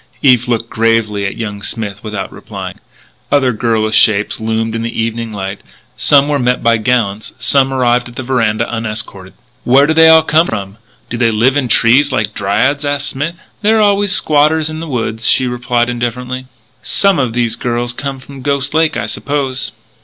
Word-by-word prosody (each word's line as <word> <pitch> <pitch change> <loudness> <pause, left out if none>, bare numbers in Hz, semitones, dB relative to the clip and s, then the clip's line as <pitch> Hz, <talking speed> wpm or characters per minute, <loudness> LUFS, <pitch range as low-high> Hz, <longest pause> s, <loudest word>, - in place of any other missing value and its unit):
Eve 125 -3 +4
looked 115 -1 -1
gravely 110 -3 0
at - - -6
young 105 -3 -5
Smith 100 -1 -4
without 105 -2 -5
replying. - - -8 0.5
Other 135 -3 +3
girlish 110 -1 -1
shapes 105 -1 +3
loomed 110 0 -2
in 115 - -3
the 115 0 -4
evening 115 0 -2
light. 95 -1 -5 0.3
Some 140 -1 +4
were 145 -1 0
met 125 0 0
by 115 0 +3
gallants, 110 -3 -1
some 135 -1 +2
arrived 125 -2 +1
at 120 - -15
the 130 - -5
veranda 115 -3 0
unescorted. 110 -4 -5 0.3
"Where 135 +3 +5
do 160 - +1
they 160 0 +6
all 160 0 +7
come 160 +2 +3
from? 100 -1 -5 0.3
Do 120 - -3
they 115 -1 +2
live 115 +5 +2
in 140 -3 0
trees 130 +5 +4
like 110 -4 -1
dryads?" 130 +10 0
asked 145 0 -1
Smith. 145 +5 -3 0.3
"There 220 +1 +3
are - - +3
always 205 -1 +2
squatters 155 -3 +2
in 155 - -6
the 165 - -6
woods," 115 -3 -2
she 130 - +3
replied 125 -1 -1
indifferently. 125 +1 -4 0.3
"Some 195 -4 +2
of 125 -4 -1
these 120 -1 0
girls 120 0 -2
come 135 +1 -5
from 135 +1 -12
Ghost 140 +1 -1
Lake, 160 0 +2
I - - -2
suppose." 135 -3 -2
120 Hz, 185 wpm, -14 LUFS, 110-140 Hz, 0.5 s, all